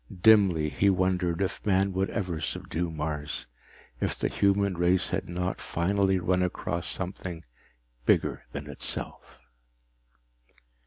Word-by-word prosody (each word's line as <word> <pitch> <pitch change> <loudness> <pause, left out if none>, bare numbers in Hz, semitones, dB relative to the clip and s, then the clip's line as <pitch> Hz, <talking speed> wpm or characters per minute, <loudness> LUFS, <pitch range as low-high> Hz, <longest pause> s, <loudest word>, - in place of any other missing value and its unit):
Dimly, 95 -8 +6
he 100 +6 +2
wondered 90 -1 +1
if 95 - -3
man 95 -1 +2
would 95 +1 0
ever 90 -6 -3
subdue 85 +2 -2
Mars, 75 -1 -3 0.5
if - - -1
the - - 0
human 100 -1 +2
race 85 +1 +2
had 95 0 -2
not 90 +1 -2
finally 95 +2 +1
run 90 +1 +1
across 90 -1 -2
something 90 -2 -4 0.6
bigger - - +2
than 70 +2 -6
itself. 70 - -5
90 Hz, 120 wpm, -28 LUFS, 85-95 Hz, 0.6 s, Dimly